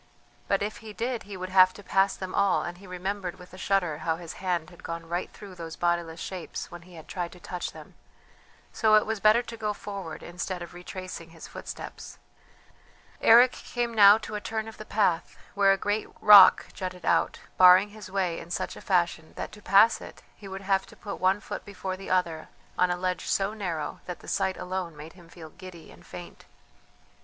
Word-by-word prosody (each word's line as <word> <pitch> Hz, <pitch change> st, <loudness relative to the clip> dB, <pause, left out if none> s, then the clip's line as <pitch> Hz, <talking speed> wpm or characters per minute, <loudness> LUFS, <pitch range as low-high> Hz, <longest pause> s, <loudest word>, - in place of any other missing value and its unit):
But 195 Hz, 0 st, +1 dB
if 210 Hz, +1 st, -4 dB
he 215 Hz, -1 st, -10 dB
did 235 Hz, +2 st, -2 dB
he 200 Hz, -, -6 dB
would 185 Hz, 0 st, -5 dB
have 185 Hz, -1 st, +6 dB
to 205 Hz, -, -11 dB
pass 195 Hz, +1 st, +2 dB
them 185 Hz, -1 st, -6 dB
all, 200 Hz, -1 st, +2 dB
and 175 Hz, 0 st, -6 dB
he 195 Hz, -, -13 dB
remembered 185 Hz, 0 st, -4 dB
with 180 Hz, 0 st, -15 dB
a -, -, -10 dB
shudder 180 Hz, -6 st, 0 dB
how 160 Hz, +1 st, 0 dB
his 170 Hz, -1 st, -8 dB
hand 175 Hz, -3 st, -1 dB
had 175 Hz, -, -15 dB
gone 165 Hz, 0 st, -6 dB
right 175 Hz, +2 st, -3 dB
through 200 Hz, -2 st, -11 dB
those 165 Hz, -2 st, -8 dB
bodiless 170 Hz, -1 st, -1 dB
shapes 185 Hz, -1 st, -6 dB
when 175 Hz, 0 st, -9 dB
he 180 Hz, 0 st, -15 dB
had 160 Hz, -, -12 dB
tried 175 Hz, -3 st, -4 dB
to 180 Hz, -, -14 dB
touch 180 Hz, +1 st, -5 dB
them, -, -, -13 dB, 0.8 s
so 215 Hz, -2 st, +4 dB
it 215 Hz, -, +5 dB
was 220 Hz, -1 st, -2 dB
better 215 Hz, +4 st, +5 dB
to 235 Hz, -, -8 dB
go 215 Hz, -2 st, -2 dB
forward 195 Hz, -5 st, -7 dB
instead 180 Hz, +1 st, -5 dB
of 175 Hz, -, -11 dB
retracing 180 Hz, -1 st, -8 dB
his 165 Hz, 0 st, -11 dB
footsteps. -, -, -9 dB, 1.0 s
Eric 240 Hz, +3 st, +7 dB
came 240 Hz, -2 st, -4 dB
now 205 Hz, -1 st, +8 dB
to 220 Hz, -1 st, -8 dB
a 210 Hz, -, -3 dB
turn 220 Hz, 0 st, -3 dB
of 225 Hz, -, -10 dB
the 215 Hz, -, -9 dB
path 180 Hz, -6 st, 0 dB, 0.2 s
where 200 Hz, -1 st, +4 dB
a 195 Hz, -, +3 dB
great 205 Hz, +2 st, -1 dB
rock 200 Hz, -3 st, +9 dB
jutted 180 Hz, -2 st, -6 dB
out, 165 Hz, -, +2 dB, 0.2 s
barring 185 Hz, +2 st, +8 dB
his 210 Hz, -2 st, -11 dB
way 185 Hz, -3 st, -1 dB
in 165 Hz, -, -11 dB
such 180 Hz, -, -3 dB
a -, -, -11 dB
fashion 175 Hz, -4 st, 0 dB
that -, -, -5 dB
to 210 Hz, -, -13 dB
pass 210 Hz, +3 st, +5 dB
it -, -, -11 dB
he 200 Hz, -, -12 dB
would 190 Hz, 0 st, -7 dB
have 195 Hz, 0 st, +1 dB
to -, -, -15 dB
put 205 Hz, -, -7 dB
one 190 Hz, +2 st, +3 dB
foot -, -, -7 dB
before 195 Hz, -2 st, -5 dB
the 195 Hz, +1 st, -9 dB
other 170 Hz, -4 st, 0 dB, 0.3 s
on 180 Hz, -, +3 dB
a 180 Hz, -, 0 dB
ledge 180 Hz, 0 st, -2 dB
so 195 Hz, +2 st, 0 dB
narrow 175 Hz, -8 st, -4 dB
that 180 Hz, -, -6 dB
the -, -, -14 dB
sight 190 Hz, -1 st, 0 dB
alone 180 Hz, -3 st, -4 dB
made 155 Hz, +2 st, -10 dB
him 175 Hz, -2 st, -17 dB
feel 160 Hz, -3 st, -12 dB
giddy 175 Hz, -2 st, -12 dB
and -, -, -17 dB
faint. -, -, -10 dB
185 Hz, 215 wpm, -27 LUFS, 175-205 Hz, 1.0 s, rock